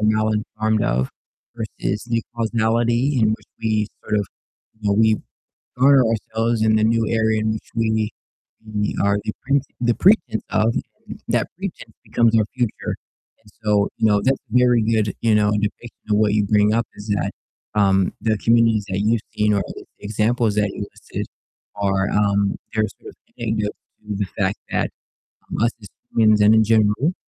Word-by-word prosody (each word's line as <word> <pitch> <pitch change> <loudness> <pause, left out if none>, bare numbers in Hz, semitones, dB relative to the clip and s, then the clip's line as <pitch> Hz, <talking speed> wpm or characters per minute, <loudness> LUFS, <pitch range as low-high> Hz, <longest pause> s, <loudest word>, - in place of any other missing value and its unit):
mal-informed 110 0 +1
of 65 +2 0 0.4
versus 110 -2 -4
the 115 -1 -1
causality 115 +3 +1
in 110 - +4
which 110 - -4 0.2
we 110 -1 +1 0.2
sort 105 - 0
of, 100 - -2 0.5
you 105 - -1
know, 100 - +3
we 110 -1 +4 0.6
guard 135 +2 +6
ourselves 115 +1 -1
in 110 0 +4
the 110 - +2
new 115 0 +2
area 110 -1 +2
in 110 0 0
which 110 - -6
we 110 -1 +1 0.7
we 105 0 0
are 100 0 +3
the - - -2
pret 140 0 +2 0.2
the 120 -1 +2
pretense 190 - +3
of, 110 +2 +2 0.3
and - - -8
that - - +1
pretense - - -7
becomes 115 -1 +2
our 110 - +4
future, 120 -4 -2 0.4
and 105 -2 -21
so, 105 -1 +3
you 110 - +3
know, 105 -1 +3
that's 135 +4 +1
a 125 -2 -1
very 125 -2 +4
good, 110 -2 +1
you 115 -2 +3
know, 105 0 +3
depiction 105 +3 -3
of 105 - +3
what 105 -1 +3
you 105 -1 +2
bring 105 +1 +3
up 115 0 +1
is 105 +1 -10
that, - - -1 0.4
um, 95 -2 +3
the 110 -1 +1
communities 115 -2 +3
that 95 0 -1
you've 110 +2 +1
seen 105 0 +2
or 100 - +2
at - - -3
least - - -10
the - - -12
examples 110 +1 +1
that 105 -1 +2
you 100 - -5
listed - - -7 0.5
are, 95 -1 0
um, 100 -1 +2 0.2
they're 110 -1 +2 0.2
sort - - -11
of - - -14 0.2
indicative 110 -3 -1 0.3
to 105 -1 -5
the 100 - 0
fact 100 -1 0
that, - - 0 0.6
um, - - -2
us 115 - +4
as 105 - -10 0.3
humans 110 -2 +5
and 105 +2 +6
in 110 - +5
general, 110 - +2
110 Hz, 185 wpm, -21 LUFS, 105-115 Hz, 0.7 s, guard